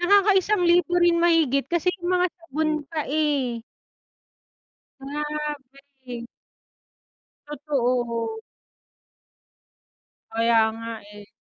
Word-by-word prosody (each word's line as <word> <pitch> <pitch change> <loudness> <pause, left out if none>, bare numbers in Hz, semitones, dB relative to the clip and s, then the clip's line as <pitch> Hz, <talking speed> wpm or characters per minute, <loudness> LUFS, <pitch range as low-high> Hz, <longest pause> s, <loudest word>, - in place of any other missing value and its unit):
Nakaka-isang 400 +1 +4
libo 350 0 +3
rin 345 -1 +4
mahigit 320 -6 +3
kasi 345 +1 +1
'yung 350 -1 -5
mga 360 0 +3
sabon 315 -2 -2
pa, 305 0 -4
eh. 280 -6 0 1.4
Grabe. 275 -3 -6 1.2
Totoo. 245 -6 -1 1.9
Kaya 230 0 +3 0.2
nga, 230 0 -6 0.2
eh. 205 -1 -12
295 Hz, 80 wpm, -24 LUFS, 245-340 Hz, 1.9 s, Nakaka-isang